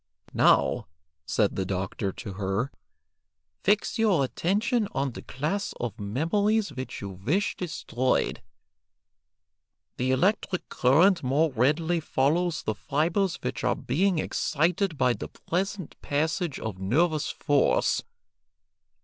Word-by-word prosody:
"Now," -, -, +3 dB, 0.4 s
said 105 Hz, +3 st, +1 dB
the 95 Hz, -, 0 dB
doctor 95 Hz, +1 st, -2 dB
to 100 Hz, 0 st, -8 dB
her, 95 Hz, +6 st, -2 dB, 0.9 s
"fix 210 Hz, +3 st, +1 dB
your 200 Hz, -10 st, +3 dB
attention 210 Hz, -, 0 dB
on 135 Hz, 0 st, -1 dB
the -, -, -8 dB
class 155 Hz, +10 st, -3 dB
of 115 Hz, -3 st, -4 dB
memories 195 Hz, -, +1 dB
which 130 Hz, 0 st, -6 dB
you 100 Hz, -, -5 dB
wish 140 Hz, -, -1 dB
destroyed; 130 Hz, -7 st, -1 dB, 1.6 s
the 125 Hz, +1 st, 0 dB
electric 180 Hz, +7 st, +1 dB
current 170 Hz, +8 st, +4 dB
more 140 Hz, +5 st, +2 dB
readily 155 Hz, +8 st, +2 dB
follows 155 Hz, +3 st, 0 dB
the 110 Hz, -, -1 dB
fibres 165 Hz, -, 0 dB
which -, -, -3 dB
are -, -, +2 dB
being 180 Hz, +7 st, +1 dB
excited 165 Hz, +3 st, 0 dB
by 125 Hz, -2 st, +3 dB
the -, -, -6 dB
present 190 Hz, 0 st, -3 dB
passage 155 Hz, +2 st, -1 dB
of 105 Hz, -4 st, -5 dB
nervous 150 Hz, -, +1 dB
force. 150 Hz, -, +2 dB
155 Hz, 115 wpm, -27 LUFS, 125-180 Hz, 1.6 s, current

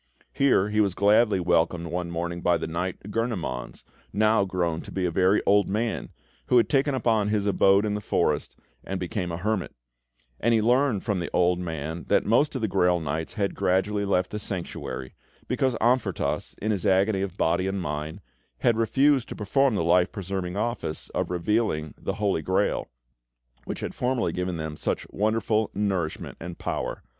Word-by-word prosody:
Here 125 Hz, -8 st, +3 dB
he 105 Hz, 0 st, +2 dB
was 100 Hz, -3 st, +1 dB
gladly 105 Hz, 0 st, +4 dB
welcomed 85 Hz, -1 st, +1 dB
one 85 Hz, +1 st, -3 dB
morning 85 Hz, +1 st, -3 dB
by 85 Hz, -1 st, +3 dB
the 80 Hz, -, -4 dB
knight, 90 Hz, +5 st, -4 dB
Gurnemanz, 100 Hz, -, -3 dB, 0.3 s
now 110 Hz, -1 st, +3 dB
grown 85 Hz, -4 st, -1 dB
to -, -, -10 dB
be 95 Hz, -1 st, -1 dB
a 90 Hz, -, 0 dB
very 95 Hz, +4 st, +3 dB
old 100 Hz, 0 st, +4 dB
man, 110 Hz, +3 st, -2 dB, 0.4 s
who 125 Hz, -, +4 dB
had 115 Hz, -, +4 dB
taken 140 Hz, 0 st, +2 dB
up 130 Hz, -, -4 dB, 0.2 s
his 105 Hz, -1 st, 0 dB
abode 100 Hz, 0 st, +4 dB
in 105 Hz, -, -1 dB
the 105 Hz, -, -2 dB
forest, 75 Hz, -6 st, 0 dB, 0.3 s
and 95 Hz, 0 st, -4 dB
become 90 Hz, 0 st, -3 dB
a 85 Hz, -, -3 dB
hermit; 105 Hz, +1 st, -2 dB, 0.6 s
and 115 Hz, +1 st, +3 dB
he -, -, +4 dB
learned 125 Hz, -2 st, +2 dB
from 100 Hz, -3 st, -1 dB
the 85 Hz, -, -3 dB
old 90 Hz, 0 st, +3 dB
man 80 Hz, -1 st, -4 dB
that -, -, +3 dB
most 135 Hz, +7 st, +3 dB
of 130 Hz, -, -2 dB
the 110 Hz, -, +1 dB
Grail 90 Hz, -2 st, +2 dB
Knights 80 Hz, +1 st, -3 dB
had 100 Hz, -2 st, 0 dB
gradually 100 Hz, +2 st, +1 dB
left 90 Hz, -2 st, +1 dB
the 105 Hz, -, -3 dB
Sanctuary, 85 Hz, -9 st, -5 dB, 0.3 s
because 130 Hz, -2 st, +1 dB
Amfortas, 115 Hz, -, 0 dB
in 110 Hz, -, -1 dB
his 100 Hz, -4 st, -1 dB
agony 95 Hz, +1 st, +3 dB
of 100 Hz, -1 st, -4 dB
body 90 Hz, +3 st, +1 dB
and 95 Hz, 0 st, -2 dB
mind, 75 Hz, +2 st, -4 dB, 0.4 s
had 115 Hz, -2 st, +3 dB
refused 135 Hz, +3 st, +3 dB
to -, -, -6 dB
perform 130 Hz, +4 st, +2 dB
the 85 Hz, -, 0 dB
life 90 Hz, +2 st, +3 dB
preserving 95 Hz, -2 st, -4 dB
office 110 Hz, -8 st, -3 dB
of -, -, -2 dB
revealing 90 Hz, -3 st, 0 dB
the 95 Hz, -, -4 dB
Holy 100 Hz, -5 st, 0 dB
Grail, -, -, 0 dB, 0.8 s
which -, -, -5 dB
had -, -, -4 dB
formerly 125 Hz, -8 st, 0 dB
given 90 Hz, -1 st, -2 dB
them 80 Hz, -1 st, -5 dB
such -, -, -2 dB
wonderful 110 Hz, +1 st, +1 dB
nourishment 95 Hz, -6 st, -2 dB
and 85 Hz, 0 st, -7 dB
power. -, -, -3 dB
95 Hz, 180 wpm, -26 LUFS, 85-110 Hz, 0.8 s, gladly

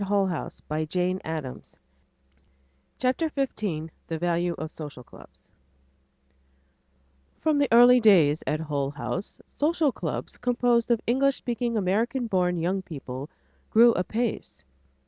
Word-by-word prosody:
[Editor: 195 Hz, -4 st, 0 dB, 0.2 s
Mary 155 Hz, 0 st, -2 dB
Mark 185 Hz, +1 st, 0 dB
Ockerbloom] 155 Hz, -5 st, -6 dB, 1.2 s
CHAPTER 260 Hz, +6 st, 0 dB
XV 205 Hz, -, -2 dB, 0.2 s
THE 165 Hz, -, -3 dB
VALUE 175 Hz, +1 st, 0 dB
OF 155 Hz, 0 st, -6 dB
SOCIAL 145 Hz, -5 st, -9 dB
CLUBS -, -, -18 dB, 1.9 s
From 310 Hz, -2 st, +1 dB
the 285 Hz, -, +3 dB
early 245 Hz, +2 st, +8 dB
days 170 Hz, -9 st, +5 dB
at 155 Hz, +1 st, 0 dB
Hull 145 Hz, -3 st, -2 dB
House, 145 Hz, +7 st, -5 dB, 0.2 s
social 305 Hz, -1 st, +2 dB
clubs -, -, -5 dB
composed 245 Hz, -1 st, +1 dB
of 235 Hz, -2 st, +2 dB
English 270 Hz, +3 st, +2 dB
speaking 235 Hz, -1 st, -2 dB
American 225 Hz, +6 st, 0 dB
born 180 Hz, -4 st, +1 dB
young 180 Hz, +4 st, -1 dB
people 140 Hz, -5 st, -7 dB, 0.4 s
grew 235 Hz, +2 st, +6 dB
apace. 220 Hz, +5 st, -3 dB
195 Hz, 120 wpm, -26 LUFS, 160-240 Hz, 1.9 s, early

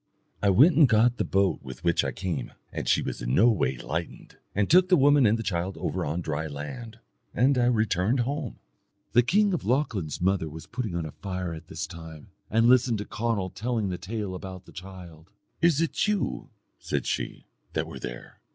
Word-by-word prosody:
I 100 Hz, -, +3 dB
went 140 Hz, -, +6 dB
and 150 Hz, -5 st, +6 dB
got 120 Hz, +2 st, +4 dB
the -, -, +1 dB
boat 95 Hz, -1 st, +1 dB
with 65 Hz, -2 st, -10 dB
which 85 Hz, -1 st, +2 dB
I -, -, -1 dB
came, 85 Hz, -10 st, -4 dB, 0.2 s
and -, -, -3 dB
she -, -, +3 dB
was -, -, -5 dB
no 65 Hz, -, +4 dB
way 65 Hz, -, 0 dB
lightened, 80 Hz, +8 st, -5 dB, 0.2 s
and 100 Hz, 0 st, +2 dB
took 180 Hz, +2 st, +5 dB
the 180 Hz, -, +6 dB
woman 145 Hz, -2 st, +5 dB
and 110 Hz, +2 st, +3 dB
the 115 Hz, -, -4 dB
child 95 Hz, -1 st, -2 dB
over -, -, -2 dB
on 80 Hz, +5 st, -2 dB
dry 80 Hz, -1 st, -3 dB
land; 110 Hz, -, -7 dB, 0.4 s
and 130 Hz, +5 st, +4 dB
I 125 Hz, -1 st, +3 dB
returned 110 Hz, 0 st, +2 dB
home." 140 Hz, 0 st, -3 dB, 0.5 s
The 120 Hz, -, +6 dB
king 200 Hz, -, +2 dB
of 175 Hz, -, -2 dB
Lochlann's 110 Hz, -, -1 dB
mother 90 Hz, -3 st, +1 dB
was 80 Hz, +1 st, -9 dB
putting 115 Hz, -7 st, -4 dB
on 85 Hz, -2 st, -2 dB
a 80 Hz, -, -6 dB
fire 90 Hz, -2 st, -4 dB
at 80 Hz, -1 st, -10 dB
this -, -, -4 dB
time, 80 Hz, -2 st, -11 dB, 0.2 s
and 115 Hz, +1 st, +3 dB
listening 120 Hz, -1 st, +4 dB
to 105 Hz, -, -5 dB
Conall 105 Hz, -5 st, -2 dB
telling 110 Hz, -2 st, -1 dB
the 90 Hz, -, -4 dB
tale 105 Hz, -2 st, -4 dB
about 95 Hz, 0 st, -8 dB
the -, -, -15 dB
child. 90 Hz, -3 st, -11 dB, 0.3 s
"Is 165 Hz, -3 st, +4 dB
it 165 Hz, +5 st, 0 dB
you," 210 Hz, -2 st, -1 dB, 0.3 s
said -, -, -2 dB
she, -, -, -3 dB, 0.3 s
"that -, -, 0 dB
were -, -, -9 dB
there?" -, -, -8 dB
100 Hz, 200 wpm, -27 LUFS, 85-125 Hz, 0.5 s, went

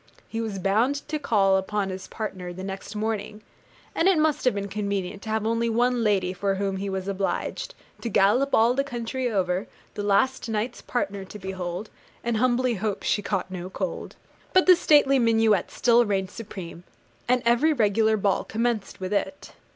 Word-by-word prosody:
He 225 Hz, -, -3 dB
was 215 Hz, -3 st, -3 dB
bound 225 Hz, +9 st, +1 dB
to 305 Hz, -, -1 dB
call 195 Hz, -8 st, +3 dB
upon 195 Hz, +1 st, -1 dB
his 185 Hz, 0 st, -7 dB
partner 190 Hz, -5 st, -5 dB
the 185 Hz, +2 st, -8 dB
next 195 Hz, +2 st, -6 dB
morning, 210 Hz, 0 st, -3 dB, 0.5 s
and 330 Hz, -, +2 dB
it 385 Hz, -3 st, +5 dB
must 305 Hz, -2 st, +1 dB
have 250 Hz, -, +3 dB
been 200 Hz, 0 st, -3 dB
convenient 200 Hz, -1 st, -3 dB
to 220 Hz, -, -8 dB
have 220 Hz, 0 st, 0 dB
only 230 Hz, +1 st, +1 dB
one 240 Hz, +1 st, +2 dB
lady 190 Hz, -4 st, +1 dB
for 195 Hz, +1 st, -1 dB
whom 195 Hz, 0 st, -2 dB
he 195 Hz, +1 st, -3 dB
was 190 Hz, 0 st, -3 dB
obliged 200 Hz, -, -2 dB, 0.3 s
To 235 Hz, -, -3 dB
gallop 230 Hz, +8 st, +3 dB
all 230 Hz, +2 st, +4 dB
the 275 Hz, +2 st, +1 dB
country 245 Hz, -1 st, -3 dB
over, 185 Hz, -2 st, 0 dB, 0.3 s
The 205 Hz, -, -4 dB
last 210 Hz, +5 st, +1 dB
night's 225 Hz, +3 st, -2 dB
partner 200 Hz, -5 st, -2 dB
to 210 Hz, -, -10 dB
behold, 190 Hz, 0 st, -5 dB, 0.3 s
And 235 Hz, -1 st, 0 dB
humbly 250 Hz, +1 st, +2 dB
hope 205 Hz, -1 st, -3 dB
she 205 Hz, -, +1 dB
caught 195 Hz, -2 st, -2 dB
no 180 Hz, 0 st, -5 dB
cold. -, -, -5 dB, 0.4 s
But 370 Hz, -1 st, +5 dB
the 365 Hz, -, +8 dB
stately 290 Hz, -5 st, +4 dB
minuet 225 Hz, -4 st, +3 dB
still 240 Hz, 0 st, +4 dB
reigned 195 Hz, -3 st, -1 dB
supreme; 185 Hz, -6 st, -8 dB, 0.4 s
and 250 Hz, 0 st, +2 dB
every 240 Hz, +7 st, +4 dB
regular 220 Hz, -4 st, +2 dB
ball 200 Hz, -1 st, +1 dB
commenced 225 Hz, -2 st, -2 dB
with 185 Hz, +1 st, -3 dB
it. 195 Hz, -1 st, -3 dB
210 Hz, 180 wpm, -25 LUFS, 195-240 Hz, 0.5 s, the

